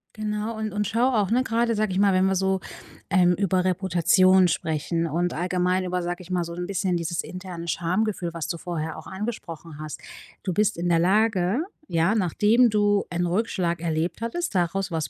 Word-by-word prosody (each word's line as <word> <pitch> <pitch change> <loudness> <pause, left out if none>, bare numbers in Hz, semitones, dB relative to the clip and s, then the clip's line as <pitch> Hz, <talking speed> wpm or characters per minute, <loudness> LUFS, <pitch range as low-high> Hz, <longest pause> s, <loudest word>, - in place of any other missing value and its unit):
Genau 215 +1 -3
und 215 -2 -3
und 210 -1 -1
schaue 245 +4 +2
auch, 205 -5 +2
ne, 250 +3 +2
grade 230 -1 +1
sage 215 -1 0
ich 185 - -1
mal, 200 -1 +4
wenn 185 0 +3
wir 190 0 +2
so, 190 0 +1 0.5
ähm, 180 -2 +4
über 185 0 +1
Reputation 185 0 +4
sprechen 165 0 -1
und 170 +3 -1
allgemein 180 +2 0
über, 180 0 -1
sage 175 +1 -4
ich 180 - -12
mal, 180 -1 +1
so 170 0 -7
'n 175 +1 -4
bisschen 185 -1 -1
dieses 170 0 -2
interne 180 -2 -8
Schamgefühl, 180 +1 -1
was 165 -3 -4
du 170 - -3
vorher 160 -2 -4
auch 160 - -10
angesprochen 170 -7 -6
hast. 155 -1 -7 0.4
Du 185 - -2
bist 210 +2 +1
in 175 +1 -1
der 165 -1 +4
Lage, 200 - +2 0.2
ja, 170 +6 +2
nachdem 215 +5 +3
du 205 -1 +2
einen 175 0 0
Rückschlag 180 -3 -1
erlebt 165 +3 -2
hattest, 235 - -3
daraus 185 +2 0
was 160 -2 -2
185 Hz, 195 wpm, -25 LUFS, 170-210 Hz, 0.5 s, mal